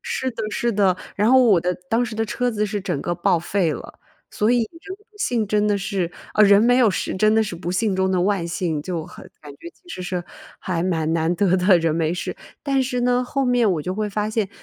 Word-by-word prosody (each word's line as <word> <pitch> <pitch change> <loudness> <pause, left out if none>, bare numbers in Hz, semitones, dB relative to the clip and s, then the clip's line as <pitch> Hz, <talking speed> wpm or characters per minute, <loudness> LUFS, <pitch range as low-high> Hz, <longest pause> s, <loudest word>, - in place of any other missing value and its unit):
是 260 0 -2
的 225 -1 -6
是 235 +2 -1
的， 195 -3 +2 0.2
然 210 +4 +3
后 260 -1 +6
我 200 -8 +5
的 180 +1 -1 0.2
当 230 +2 +2
时 225 - -4
的 225 +1 -1
车 245 +3 -1
子 210 -2 -1
是 205 -1 -3
整 175 -7 -3
个 175 - -2
报 175 0 +1
废 175 0 0
了， - - -8 0.3
所 210 +2 +1
以 245 -1 +3
人 335 - -7
不 415 0 -25
幸 230 - 0
真 210 +1 +1
的 205 - +2
是 195 -3 -2 0.2
呃， 215 - +4
人 200 +1 +6
没 245 +2 +4
有 230 -5 +5
事， - - -3
真 215 +3 +3
的 220 - +4
是 210 -5 -4
不 170 +1 -5
幸 195 +2 0
中 190 0 +1
的 185 - +1
万 190 -4 0
幸， 165 -3 -2
就 165 0 -4
很 - - -13
感 145 -1 -10
觉 150 +4 -11
其 360 - -32
实 185 - -6
是 175 -1 -3 0.3
还 170 -3 -2
蛮 160 -3 0
难 165 +1 +1
得 185 -1 +2
的 185 0 +5
人 165 -1 0
没 165 0 0
事。 180 - -4 0.3
但 275 -2 +1
是 250 -1 -2
呢， 250 0 +2
后 275 +2 -2
面 245 -4 +3
我 155 - -2
就 185 +4 -3
会 210 +1 -2
发 210 +1 -2
现， 215 -3 -1
205 Hz, 270 characters per minute, -22 LUFS, 175-230 Hz, 0.3 s, 后